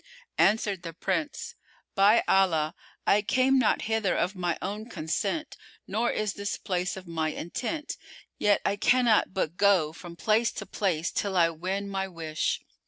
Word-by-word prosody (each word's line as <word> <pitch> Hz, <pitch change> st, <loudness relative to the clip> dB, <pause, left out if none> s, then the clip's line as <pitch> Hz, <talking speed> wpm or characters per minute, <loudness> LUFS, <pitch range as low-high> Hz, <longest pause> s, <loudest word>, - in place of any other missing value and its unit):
Answered 205 Hz, -2 st, +3 dB
the 165 Hz, -2 st, -7 dB
Prince, 295 Hz, -, -2 dB, 0.4 s
"By 205 Hz, +3 st, +5 dB
Allah, 165 Hz, -5 st, +3 dB, 0.3 s
I 205 Hz, -, +4 dB
came 255 Hz, +5 st, +3 dB
not 235 Hz, -, +2 dB
hither 220 Hz, -3 st, 0 dB
of 185 Hz, +4 st, 0 dB
my 175 Hz, -2 st, -1 dB
own 210 Hz, +5 st, -5 dB
consent 200 Hz, -, -2 dB, 0.3 s
nor 225 Hz, +5 st, 0 dB
is 210 Hz, -1 st, -1 dB
this 200 Hz, 0 st, -3 dB
place 185 Hz, -1 st, -2 dB
of 190 Hz, -, -9 dB
my 160 Hz, -2 st, -1 dB
intent; 260 Hz, -, -4 dB, 0.4 s
yet 205 Hz, -1 st, +3 dB
I 200 Hz, -, +1 dB
cannot 240 Hz, -2 st, +3 dB
but 175 Hz, -2 st, -1 dB
go 185 Hz, -7 st, +3 dB
from 170 Hz, 0 st, -10 dB
place 220 Hz, +5 st, +2 dB
to -, -, -6 dB
place 175 Hz, -5 st, -1 dB
till 195 Hz, -2 st, -1 dB
I 165 Hz, -1 st, +4 dB
win 190 Hz, +5 st, -3 dB
my 195 Hz, -1 st, -2 dB
wish." 160 Hz, -3 st, -2 dB
195 Hz, 160 wpm, -28 LUFS, 175-215 Hz, 0.4 s, By